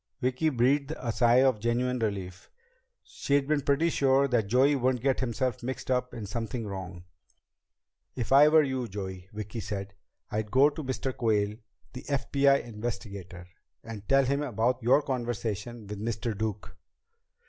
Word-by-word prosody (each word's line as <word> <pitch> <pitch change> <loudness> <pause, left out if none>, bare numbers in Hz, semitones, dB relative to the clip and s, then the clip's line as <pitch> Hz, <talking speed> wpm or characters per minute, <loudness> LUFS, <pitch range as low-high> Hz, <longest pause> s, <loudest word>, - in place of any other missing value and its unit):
Vicki 130 +5 +1
breathed 135 +2 +2
a - - -6
deep 115 - 0
sigh 120 +3 +4
of 130 -5 +3
genuine 125 +3 0
relief. 95 -5 -4 0.5
She'd 140 -1 -1
been 150 -1 +1
pretty 145 +4 +2
sure 135 -1 +3
that 115 -5 +1
Joey 130 +6 +4
wouldn't 130 -2 0
get 135 -1 +2
himself 125 -1 -1
mixed 130 +1 -4
up 125 0 0
in 110 - -6
something 115 +3 -4
wrong. 95 -3 -7 1.1
"If 120 -1 -4
I 140 +2 +8
were 155 0 +6
you, 130 -3 -2
Joey," 95 -2 -7
Vicki 105 +2 -6
said, 100 -1 -5 0.4
"I'd 105 0 -2
go 135 +6 +5
to 155 +1 -6
Mr. 130 0 -3
Quayle, 105 -3 +1 0.4
the 125 - -7
FBI 140 0 +2
investigator, 105 -6 -6 0.4
and 110 -3 -9
tell 135 0 +5
him 140 +2 0
about 125 -1 0
your 130 +5 +4
conversation 120 -3 -3
with 105 0 -7
Mr. 115 0 -2
Duke." 105 -1 -4
120 Hz, 160 wpm, -28 LUFS, 105-135 Hz, 1.1 s, I